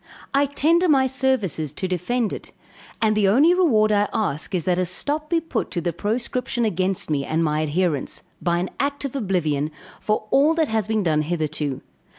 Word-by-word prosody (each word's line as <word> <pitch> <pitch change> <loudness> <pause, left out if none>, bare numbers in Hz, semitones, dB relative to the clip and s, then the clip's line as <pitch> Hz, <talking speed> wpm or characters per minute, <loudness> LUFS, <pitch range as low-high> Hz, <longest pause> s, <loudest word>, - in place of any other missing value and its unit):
I 280 +1 +3
tender 330 +6 +2
my 270 -3 +4
services 235 - 0
to 190 - -2
defend 205 +6 -1
it; - - -8 0.5
and 215 -1 +3
the 210 -2 +3
only 280 - +5
reward 235 -13 +3
I 205 0 +2
ask 190 -3 -2
is 175 - -1
that 180 +1 +1
a 185 - +1
stop 295 - -2
be 335 - +2
put 320 -8 -3
to - - -2
the 170 0 -2
proscription 235 +5 -1
against 185 -4 -1
me 140 -2 +1
and 160 +3 0
my 155 -1 0
adherents, 155 -1 -1 0.2
by 170 -1 +1
an 180 +2 -2
act 280 0 -1
of 275 - -5
oblivion, 165 - 0 0.3
for 215 0 -1
all 290 +4 +4
that 320 -3 +1
has 220 -3 0
been 220 -1 0
done 155 -3 +2
hitherto. 155 -4 -2
205 Hz, 190 wpm, -23 LUFS, 170-265 Hz, 0.5 s, only